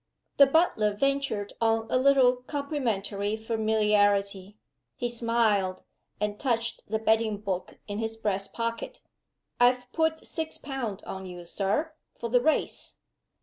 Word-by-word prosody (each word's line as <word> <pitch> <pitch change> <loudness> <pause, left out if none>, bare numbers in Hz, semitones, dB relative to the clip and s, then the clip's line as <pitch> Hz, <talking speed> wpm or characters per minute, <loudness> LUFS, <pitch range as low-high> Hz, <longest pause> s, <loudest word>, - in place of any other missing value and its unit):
The 280 - +8
butler 265 -9 +2
ventured 275 -5 0
on 225 0 +2
a - - +2
little 260 -2 +5
complimentary 230 -7 -2
familiarity. 210 -3 +1 0.4
He 240 - -2
smiled, 225 -5 +1 0.4
and 210 0 -2
touched 235 -4 -1
the 220 - +1
betting 220 -1 +2
book 195 -3 -4
in 205 0 -4
his 225 0 -3
breast 195 -3 -2
pocket. 230 0 -4 0.6
"I've 245 0 +3
put 320 +1 0
six 320 -1 -4
pound 250 -8 -5
on 190 0 -6
you, 175 -1 -9
Sir, 200 - -1 0.3
for 235 - -4
the 245 +1 +4
Race." 315 +4 -1
225 Hz, 130 wpm, -28 LUFS, 205-250 Hz, 0.6 s, The